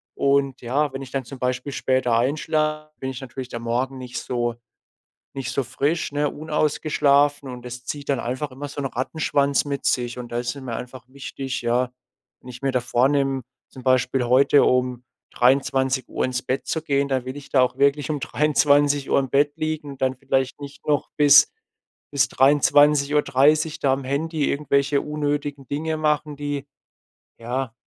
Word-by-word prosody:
Und 140 Hz, -1 st, +1 dB
ja, 140 Hz, +5 st, 0 dB
wenn 135 Hz, -, -5 dB
ich 125 Hz, -, -11 dB
dann 135 Hz, -2 st, -3 dB
zum 135 Hz, +1 st, -10 dB
Beispiel 125 Hz, +2 st, -2 dB
später 130 Hz, -4 st, +1 dB
einschlafe, 155 Hz, +4 st, 0 dB
bin 130 Hz, -, -3 dB
ich 130 Hz, 0 st, -8 dB
natürlich 130 Hz, 0 st, -7 dB
der 115 Hz, -, -5 dB
Morgen 125 Hz, +3 st, -2 dB
nicht 125 Hz, -1 st, -7 dB
so 120 Hz, -1 st, -2 dB, 0.8 s
nicht 130 Hz, -3 st, -4 dB
so 140 Hz, -, 0 dB
frisch, 145 Hz, +7 st, -1 dB
ne? 145 Hz, 0 st, 0 dB
Unausgeschlafen, 145 Hz, -2 st, +1 dB
und 125 Hz, -1 st, -8 dB
das 125 Hz, 0 st, -8 dB
zieht 145 Hz, +1 st, -6 dB
dann 135 Hz, -, +1 dB
einfach 130 Hz, +4 st, -3 dB
immer 140 Hz, +3 st, -7 dB
so 145 Hz, +1 st, -6 dB
'n -, -, -3 dB
Rattenschwanz 140 Hz, +2 st, 0 dB
mit 140 Hz, -1 st, -4 dB
sich. 120 Hz, -1 st, 0 dB
Und 120 Hz, -1 st, -8 dB
da 120 Hz, -, -1 dB
ist 120 Hz, +3 st, -3 dB
es 140 Hz, -, -9 dB
mir 125 Hz, -3 st, -5 dB
einfach 125 Hz, 0 st, -8 dB
wichtig, 135 Hz, 0 st, -6 dB
ja, 120 Hz, +1 st, 0 dB, 0.5 s
wenn 125 Hz, -, -12 dB
ich 125 Hz, +1 st, -10 dB
mir 135 Hz, -1 st, 0 dB
da 125 Hz, -1 st, +1 dB
vornehme, 135 Hz, +2 st, +1 dB, 0.3 s
zum 130 Hz, -, -12 dB
Beispiel 130 Hz, 0 st, +2 dB
heute 135 Hz, +3 st, +5 dB
um 125 Hz, -1 st, +1 dB, 0.3 s
23:00 130 Hz, +1 st, +1 dB
ins 125 Hz, -1 st, -2 dB
Bett 130 Hz, +1 st, -2 dB
zu 160 Hz, -, -1 dB
gehen, 140 Hz, -2 st, 0 dB
dann 130 Hz, -2 st, -1 dB
will 130 Hz, +2 st, -6 dB
ich 145 Hz, -, -11 dB
da 130 Hz, -, +4 dB
auch 125 Hz, -, +1 dB
wirklich 140 Hz, +2 st, +2 dB
um 150 Hz, -, -2 dB
23:00 145 Hz, -1 st, +2 dB
im 135 Hz, -1 st, -2 dB
Bett 145 Hz, +2 st, +2 dB
liegen 155 Hz, -2 st, -3 dB
und 135 Hz, -, -12 dB
dann 130 Hz, 0 st, +1 dB
vielleicht 135 Hz, +1 st, -1 dB
nicht 140 Hz, 0 st, -10 dB
noch 145 Hz, -1 st, +1 dB
bis 145 Hz, 0 st, +7 dB, 0.6 s
bis 140 Hz, -2 st, +2 dB
23:30 145 Hz, +2 st, +3 dB
da 135 Hz, -2 st, +2 dB
am 135 Hz, -, -3 dB
Handy 150 Hz, +3 st, -1 dB
irgendwelche 140 Hz, 0 st, +1 dB
unnötigen 145 Hz, -2 st, -3 dB
Dinge 160 Hz, +2 st, -2 dB
machen, 150 Hz, -1 st, 0 dB
die 145 Hz, -1 st, -4 dB, 0.7 s
ja, 120 Hz, +1 st, -3 dB
140 Hz, 175 wpm, -23 LUFS, 130-145 Hz, 0.8 s, bis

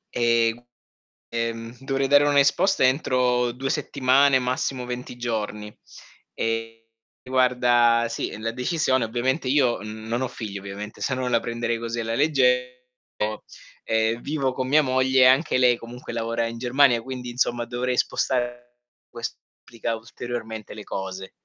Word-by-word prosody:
Ehm, 115 Hz, -1 st, +3 dB
g 120 Hz, -, -19 dB, 0.7 s
ehm, 115 Hz, 0 st, -3 dB
dovrei 135 Hz, 0 st, -1 dB
dare 145 Hz, +1 st, +5 dB
un'esposta 145 Hz, +6 st, +3 dB
entro 125 Hz, -2 st, +2 dB
2 135 Hz, +2 st, -4 dB
settimane, 135 Hz, 0 st, +3 dB
massimo 125 Hz, 0 st, -2 dB
20 125 Hz, 0 st, -6 dB
giorni. 105 Hz, -3 st, -4 dB, 0.6 s
E 115 Hz, 0 st, -3 dB, 0.3 s
guarda 125 Hz, -2 st, +3 dB
sì, 115 Hz, -, -4 dB
la 115 Hz, +1 st, -2 dB
decisione 130 Hz, -1 st, 0 dB
ovviamente 130 Hz, +5 st, -1 dB
io 130 Hz, -3 st, +2 dB
non 110 Hz, +3 st, -4 dB
ho 130 Hz, -, 0 dB
figli, 105 Hz, -5 st, -6 dB
ovviamente, 100 Hz, +2 st, -8 dB
se 130 Hz, -, 0 dB
no 130 Hz, -1 st, -2 dB
la 115 Hz, -, +3 dB
prenderei 115 Hz, 0 st, -2 dB
così 115 Hz, 0 st, -4 dB
alla 115 Hz, 0 st, -3 dB
legge 125 Hz, -3 st, +1 dB, 1.0 s
o -, -, -5 dB
ehm, 110 Hz, +1 st, +1 dB
vivo 140 Hz, -3 st, -1 dB
con 130 Hz, -1 st, -2 dB
mia 155 Hz, +2 st, +5 dB
moglie 130 Hz, 0 st, +2 dB
e -, -, +8 dB
anche 130 Hz, +1 st, +4 dB
lei 125 Hz, -1 st, +5 dB
comunque 120 Hz, +1 st, -9 dB
lavora 115 Hz, 0 st, -1 dB
in 115 Hz, 0 st, -5 dB
Germania, 125 Hz, -1 st, +3 dB
quindi 125 Hz, -1 st, -6 dB
insomma 120 Hz, -1 st, 0 dB
dovrei 125 Hz, +1 st, -2 dB
spostar 120 Hz, -1 st, 0 dB, 0.6 s
ques 115 Hz, -1 st, -5 dB, 0.2 s
complica 115 Hz, -1 st, -4 dB
ulteriormente 110 Hz, -1 st, -7 dB
le 105 Hz, -, -9 dB
cose. 95 Hz, 0 st, -6 dB
120 Hz, 145 wpm, -24 LUFS, 115-130 Hz, 1.0 s, e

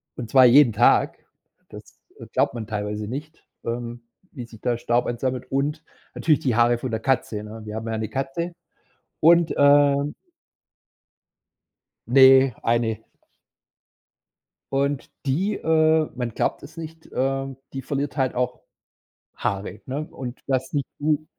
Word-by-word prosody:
Und 120 Hz, -3 st, -6 dB
zwar 130 Hz, -2 st, +7 dB
jeden 125 Hz, -1 st, +6 dB
Tag. -, -, +3 dB, 0.4 s
Das, -, -, -10 dB, 0.4 s
äh, -, -, -9 dB
glaubt -, -, +2 dB
man 115 Hz, -3 st, -6 dB
teilweise 105 Hz, -1 st, -4 dB
nicht, 150 Hz, +7 st, -7 dB, 0.2 s
ähm, 120 Hz, 0 st, -5 dB, 0.3 s
wie 125 Hz, -5 st, -8 dB
sich 110 Hz, -2 st, -15 dB
da 120 Hz, -2 st, 0 dB
Staub 120 Hz, +1 st, 0 dB
ansammelt. 125 Hz, +1 st, -3 dB
Und 145 Hz, +4 st, -1 dB, 0.3 s
natürlich 155 Hz, -3 st, +2 dB
die 125 Hz, -5 st, 0 dB
Haare 120 Hz, +1 st, +4 dB
von 125 Hz, +1 st, -5 dB
der 110 Hz, -, -1 dB
Katze, 115 Hz, -4 st, -1 dB
ne? 110 Hz, +1 st, -9 dB
Wir 105 Hz, 0 st, -6 dB
haben 110 Hz, +1 st, -5 dB
ja 110 Hz, -1 st, -2 dB
'ne 110 Hz, 0 st, -3 dB
Katze 135 Hz, +6 st, -3 dB, 0.7 s
und 170 Hz, +1 st, +5 dB
ähm 145 Hz, 0 st, +4 dB, 1.9 s
Ne, 130 Hz, +1 st, +7 dB
1. 115 Hz, -1 st, +1 dB, 1.7 s
Und 140 Hz, 0 st, -1 dB, 0.2 s
die, 180 Hz, +10 st, 0 dB
äh, 160 Hz, -2 st, +2 dB
man 120 Hz, -2 st, -3 dB
glaubt -, -, -1 dB
es -, -, -12 dB
nicht 160 Hz, 0 st, -9 dB
äh, 135 Hz, 0 st, -1 dB, 0.2 s
die 135 Hz, -, -4 dB
verliert 140 Hz, +2 st, -3 dB
halt 130 Hz, -2 st, 0 dB
auch 125 Hz, 0 st, -2 dB, 0.7 s
Haare, 100 Hz, +1 st, -3 dB
ne? 140 Hz, +4 st, -4 dB
Und 125 Hz, -1 st, -7 dB
das 130 Hz, -1 st, -1 dB
nicht 140 Hz, -2 st, -1 dB
zu 150 Hz, +1 st, 0 dB
130 Hz, 145 wpm, -23 LUFS, 120-145 Hz, 1.9 s, zwar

